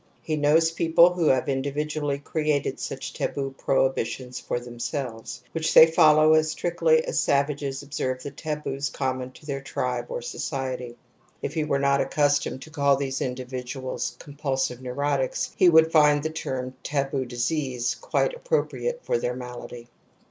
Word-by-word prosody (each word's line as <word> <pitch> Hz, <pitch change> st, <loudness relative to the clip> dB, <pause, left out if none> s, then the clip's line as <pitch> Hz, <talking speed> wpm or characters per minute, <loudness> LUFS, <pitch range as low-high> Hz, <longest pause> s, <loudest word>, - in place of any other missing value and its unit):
He 155 Hz, -2 st, -1 dB
knowsmeople 165 Hz, +3 st, +4 dB
who 175 Hz, -3 st, +1 dB
have 130 Hz, -1 st, +3 dB
individually 145 Hz, +1 st, -1 dB
created 150 Hz, 0 st, -1 dB
such -, -, -5 dB
taboo 135 Hz, -1 st, -3 dB
prohibi 135 Hz, -1 st, +1 dB
tions 125 Hz, +1 st, -7 dB
for 120 Hz, -, -3 dB
themselves, 120 Hz, 0 st, -5 dB
which 165 Hz, -1 st, -1 dB
they -, -, +11 dB
follow 155 Hz, -1 st, +5 dB
as 155 Hz, 0 st, +3 dB
strictly 470 Hz, -, +2 dB
as -, -, -1 dB
savages 140 Hz, -1 st, 0 dB
obseKre 130 Hz, -3 st, -3 dB
the 140 Hz, -, -7 dB
taboos 145 Hz, -2 st, -3 dB
common 130 Hz, -1 st, -3 dB
to 150 Hz, -, -16 dB
their 140 Hz, -2 st, -3 dB
tribe 125 Hz, -3 st, -3 dB
or 120 Hz, -, -4 dB
society. 130 Hz, -2 st, -4 dB
1 -, -, -25 dB, 0.5 s
If -, -, -3 dB
he 160 Hz, -, 0 dB
were 145 Hz, -2 st, +1 dB
not 140 Hz, 0 st, +2 dB
accus 145 Hz, 0 st, +2 dB
tomed 130 Hz, -, -5 dB
to 155 Hz, -, -13 dB
call 140 Hz, -3 st, +3 dB
these 135 Hz, -1 st, -3 dB
individuals 125 Hz, 0 st, -4 dB
^^cgmpijlsion 135 Hz, -3 st, -3 dB
neurotics 135 Hz, +1 st, -1 dB
'\he 185 Hz, -, +6 dB
would 160 Hz, -1 st, +6 dB
find 150 Hz, -2 st, +5 dB
the 160 Hz, -, -2 dB
term 130 Hz, -5 st, -4 dB
\taboo 135 Hz, -2 st, -1 dB
disease 125 Hz, 0 st, -1 dB
' -, -, -22 dB
)quite -, -, 0 dB
appropriate 485 Hz, 0 st, -2 dB
for -, -, 0 dB
their 125 Hz, +1 st, -2 dB
malady. 125 Hz, -1 st, -8 dB
140 Hz, 160 wpm, -25 LUFS, 130-155 Hz, 0.5 s, they